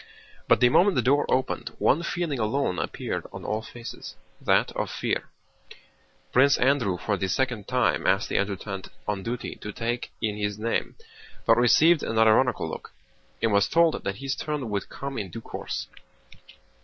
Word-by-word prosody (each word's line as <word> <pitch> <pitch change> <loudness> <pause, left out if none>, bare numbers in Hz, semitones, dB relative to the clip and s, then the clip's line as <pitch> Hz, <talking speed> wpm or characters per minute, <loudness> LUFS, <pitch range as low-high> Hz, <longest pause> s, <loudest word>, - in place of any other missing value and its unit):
But - - +4
the 125 - +7
moment 185 +9 +4
the 125 - +2
door 140 +4 +3
opened 130 0 0
one 155 - +3
feeling 170 -5 -2
alone 110 -4 0
appeared - - -3
on - - -8
all 110 +1 -1
faces—that 115 +1 -3
of - - -3
fear. - - -2 1.0
Prince 140 +3 +5
Andrew 125 -8 +2
for 100 +3 -1
the 95 - -1
second 125 -1 -1
time - - +1
asked - - +2
the - - 0
adjutant 100 -1 -3 0.2
on 105 -2 -1
duty 120 +4 -4
to 105 - -7
take 120 +3 -3
in 105 -1 -2
his 105 -1 -2
name, 115 +2 -2 0.5
but 115 - +6
received 150 +7 +5
an 115 - -2
ironical 110 +3 +4
look - - -7 0.5
and 115 -2 +2
was 100 0 +3
told 165 -1 +3
that 100 - -2
his 135 +4 -3
turn 150 -7 -3
would 100 -1 -2
come 135 -2 -5
in 100 -3 -4
due 115 - -7
course. - - -5
115 Hz, 165 wpm, -26 LUFS, 105-135 Hz, 1.0 s, the